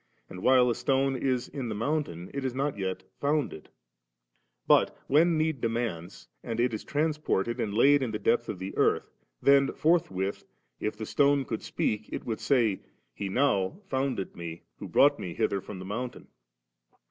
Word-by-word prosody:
And 90 Hz, -, -8 dB
while 130 Hz, +1 st, +5 dB
a 120 Hz, -, +2 dB
stone 135 Hz, +2 st, +1 dB
is 130 Hz, -1 st, 0 dB
in 130 Hz, -5 st, -5 dB
the -, -, -3 dB
mountain, 110 Hz, -, -2 dB
it 140 Hz, -1 st, -3 dB
is 130 Hz, -2 st, -2 dB
not 140 Hz, +2 st, -1 dB
yet 95 Hz, -1 st, -3 dB, 0.2 s
founded; 145 Hz, -, -1 dB, 1.0 s
but -, -, +4 dB
when 160 Hz, +4 st, +4 dB
need 155 Hz, -4 st, 0 dB
demands, 95 Hz, -, -3 dB, 0.2 s
and 115 Hz, 0 st, -4 dB
it 120 Hz, 0 st, +2 dB
is 110 Hz, -, -4 dB
transported, 150 Hz, -8 st, -1 dB
and 105 Hz, -, -1 dB
laid 140 Hz, +7 st, +5 dB
in 130 Hz, -, -1 dB
the 110 Hz, -, -2 dB
depth 120 Hz, +2 st, +1 dB
of -, -, -3 dB
the 95 Hz, +2 st, -6 dB
earth, -, -, +1 dB, 0.3 s
then 140 Hz, 0 st, +5 dB
forthwith 100 Hz, -, +1 dB, 0.4 s
if 105 Hz, 0 st, -3 dB
the 110 Hz, -, -5 dB
stone 140 Hz, +2 st, +3 dB
could 110 Hz, -, -4 dB
speak, 105 Hz, 0 st, -2 dB
it -, -, -5 dB
would 110 Hz, -2 st, -3 dB
say, 115 Hz, -8 st, +2 dB, 0.3 s
'He 100 Hz, -, -4 dB
now 110 Hz, -, +1 dB
founded 130 Hz, -7 st, -2 dB
me, 85 Hz, -1 st, -7 dB, 0.2 s
who -, -, -6 dB
brought 145 Hz, +1 st, +4 dB
me 85 Hz, -2 st, -5 dB
hither 100 Hz, -, 0 dB
from 95 Hz, -, -8 dB
the 90 Hz, -, -8 dB
mountain. 120 Hz, +5 st, -5 dB
120 Hz, 175 wpm, -28 LUFS, 100-140 Hz, 1.0 s, while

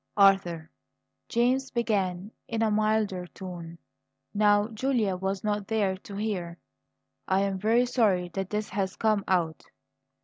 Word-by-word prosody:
"Arthur," 180 Hz, -5 st, +3 dB, 0.6 s
James 255 Hz, +3 st, +2 dB
began 200 Hz, -5 st, -1 dB, 0.2 s
in 225 Hz, -1 st, -1 dB
a 220 Hz, -, +2 dB
milder 215 Hz, -4 st, +1 dB
tone, 175 Hz, -3 st, -8 dB, 0.6 s
now 205 Hz, 0 st, +4 dB
Julia 225 Hz, -4 st, 0 dB
was 190 Hz, +1 st, -3 dB
not 205 Hz, -1 st, -1 dB
there 205 Hz, -4 st, +1 dB
to 200 Hz, +1 st, -10 dB
hear, 190 Hz, -5 st, -3 dB, 0.7 s
"I 190 Hz, +1 st, +2 dB
am 195 Hz, -1 st, -1 dB
very 230 Hz, +5 st, +3 dB
sorry 205 Hz, -8 st, +2 dB
that 195 Hz, +2 st, -4 dB
this 210 Hz, 0 st, -2 dB
has 190 Hz, -1 st, -2 dB
come 215 Hz, -3 st, +1 dB
out. 170 Hz, -4 st, 0 dB
200 Hz, 135 wpm, -28 LUFS, 185-220 Hz, 0.7 s, now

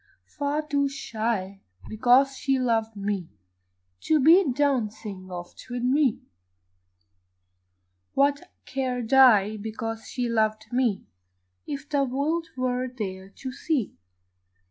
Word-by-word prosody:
Far 290 Hz, +1 st, -2 dB
too 280 Hz, -2 st, +1 dB
shy, 220 Hz, -7 st, -3 dB, 0.3 s
because 255 Hz, +5 st, +4 dB
she 270 Hz, 0 st, 0 dB
loved 225 Hz, -3 st, 0 dB
me, 200 Hz, -4 st, -3 dB, 0.8 s
To 315 Hz, -1 st, +3 dB
be 320 Hz, +2 st, +6 dB
dancing 220 Hz, -8 st, -1 dB
oft 175 Hz, -1 st, -9 dB
with 245 Hz, 0 st, -4 dB
me; 265 Hz, -1 st, +2 dB, 1.9 s
What 280 Hz, +1 st, +2 dB, 0.2 s
cared 255 Hz, -2 st, -2 dB
I, 215 Hz, -6 st, +6 dB
because 225 Hz, +1 st, -5 dB
she 245 Hz, -1 st, -2 dB
loved 220 Hz, -1 st, 0 dB
me, 245 Hz, -5 st, +1 dB, 0.6 s
If 285 Hz, 0 st, -5 dB
the 285 Hz, -2 st, +1 dB
world 290 Hz, +6 st, -1 dB
were 255 Hz, 0 st, -1 dB
there 195 Hz, -6 st, -6 dB
to 260 Hz, +6 st, -7 dB
see? 275 Hz, -, -2 dB
250 Hz, 110 wpm, -26 LUFS, 215-275 Hz, 1.9 s, be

